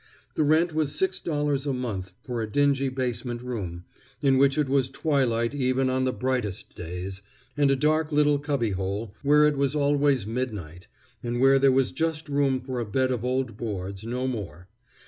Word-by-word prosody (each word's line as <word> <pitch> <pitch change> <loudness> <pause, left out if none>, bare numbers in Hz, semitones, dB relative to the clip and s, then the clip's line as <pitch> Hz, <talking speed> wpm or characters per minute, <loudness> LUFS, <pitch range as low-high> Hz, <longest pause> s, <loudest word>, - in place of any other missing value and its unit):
The - - -1
rent 160 +3 +3
was 155 -2 0
six 190 0 0
dollars 145 -3 -1
a 140 - +1
month 100 -8 -4
for 120 -3 -3
a 110 -1 -4
dingy 140 0 +2
basement 125 -2 -3
room, 95 -9 -5 0.4
in 135 -2 +3
which 140 +1 +4
it 150 -2 +2
was 135 -1 +2
twilight 130 -5 0
even 130 -1 +1
on 130 0 +1
the 130 - +1
brightest 125 -7 -2
days, 90 +3 -6 0.3
and 145 -1 +3
a 135 - +4
dark 155 +3 +1
little 145 -1 +3
cubbyhole, 105 -7 -2
where 150 +1 +5
it 150 -1 +3
was 140 +1 +1
always 145 -4 +2
midnight, 105 -8 -5 0.3
and 120 +1 -2
where 135 +1 +5
there 135 0 +5
was 130 0 +2
just 160 +1 -2
room 140 -2 +1
for 130 -1 -4
a - - -1
bed 130 +4 +1
of 120 -3 -2
old 125 -3 -1
boards, 100 -3 -5
no 125 +3 -3
more. 100 -8 -5
130 Hz, 185 wpm, -26 LUFS, 115-145 Hz, 0.4 s, where